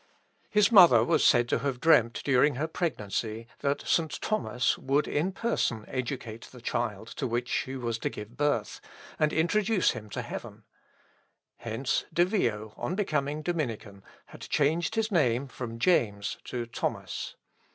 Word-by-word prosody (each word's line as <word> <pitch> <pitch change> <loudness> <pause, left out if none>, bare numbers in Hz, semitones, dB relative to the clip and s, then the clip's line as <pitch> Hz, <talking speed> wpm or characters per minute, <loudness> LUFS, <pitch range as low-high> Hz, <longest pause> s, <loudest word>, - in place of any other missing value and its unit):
His 210 +1 +4
mother 170 - +8
was - - +2
said 120 0 +5
to - - +1
have 135 -1 -2
dreamt 120 -6 +4
during 140 +1 +4
her 145 +5 -1
pregnancy, 115 - -3
that 140 0 -1
St. 160 -2 +1
Thomas 200 - 0
would 140 +3 +1
in 165 +6 0
person 185 - -1
educate 125 -3 -5
the 125 - -13
child 110 -3 -3
to - - -3
which 120 +1 -2
she 130 +1 -2
was 120 -3 -3
to - - -1
give 105 +3 -9
birth, 145 +1 -1 0.4
and 155 -1 +3
introduce 195 +4 +2
him 110 -3 -8
to - - -4
heaven. - - -8 0.9
Hence 115 +3 -2
De 175 +2 +3
Vio, 110 - -1
on 140 +10 -3
becoming 150 -6 -1
Dominican, 115 - -3 0.2
had - - -14
changed 160 +7 0
his 220 0 0
name 135 - +2
from 120 -3 -7
James 110 - +1
to 120 -1 -4
Thomas. 115 - -4
130 Hz, 150 wpm, -28 LUFS, 115-165 Hz, 0.9 s, mother